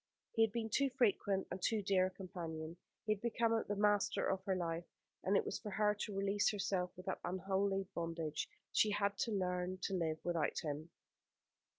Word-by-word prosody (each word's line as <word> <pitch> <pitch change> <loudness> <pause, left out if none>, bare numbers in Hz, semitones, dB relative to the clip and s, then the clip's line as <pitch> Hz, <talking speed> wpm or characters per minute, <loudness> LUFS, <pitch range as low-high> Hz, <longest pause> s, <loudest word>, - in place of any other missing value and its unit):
He 225 - +1
had 225 -1 +5
been 225 0 -2
too 275 +4 +3
frequent 200 -5 +2
and 180 - -4
too 215 +2 +1
dear 190 -1 +4
a - - -3
companion. 170 -4 -6 0.3
He 215 - +1
had 205 - -9
become 230 0 +1 0.2
the 205 - 0
master 205 0 +3
of 190 0 -2
her 190 - +2
life, 170 -1 -2 0.4
and 195 +1 +4
it - - +1
was - - -2
for 215 - -6
her 210 +1 +3
to 205 -1 -4
release 200 +1 +3
herself 190 -3 0
from 180 - -9
that 190 - -2
unholy 195 +1 0
bondage. 165 -2 -2 0.2
She 215 - +4
had 200 -1 +1
to 230 - +1
learn 180 -2 0
to 195 - -1
live 165 -4 0
without 170 -4 0
him. 155 +1 -3
195 Hz, 195 wpm, -38 LUFS, 180-205 Hz, 0.4 s, had